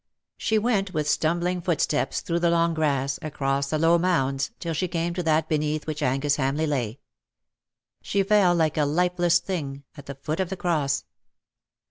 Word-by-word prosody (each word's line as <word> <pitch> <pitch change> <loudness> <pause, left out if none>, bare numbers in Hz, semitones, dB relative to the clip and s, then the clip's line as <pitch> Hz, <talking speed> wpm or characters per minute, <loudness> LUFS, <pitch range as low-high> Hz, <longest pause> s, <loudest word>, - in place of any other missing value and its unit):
She 220 - 0
went 205 -5 0
with 150 -1 0
stumbling 175 +4 0
footsteps 165 -4 0
through 170 0 -1
the 170 0 +2
long 170 0 +2
grass, 140 -2 0
across 140 -3 -1
the 155 - 0
low 165 +2 +4
mounds, 135 -6 +1
till 165 -1 -3
she 170 +4 -1
came 170 0 -2
to 180 - -2
that 160 -1 +1
beneath 155 0 -1
which 155 -1 -4
Angus 135 +3 +1
Hamleigh 140 +3 0
lay. 130 -5 -2 1.0
She 200 0 0
fell 195 -3 +4
like 160 -3 +1
a 150 - +3
lifeless 175 +2 +2
thing 145 -7 -4
at 145 - -12
the 140 - -6
foot 155 +5 -4
of 190 -2 0
the 190 - -4
cross. 150 -7 0
160 Hz, 175 wpm, -25 LUFS, 145-175 Hz, 1.0 s, low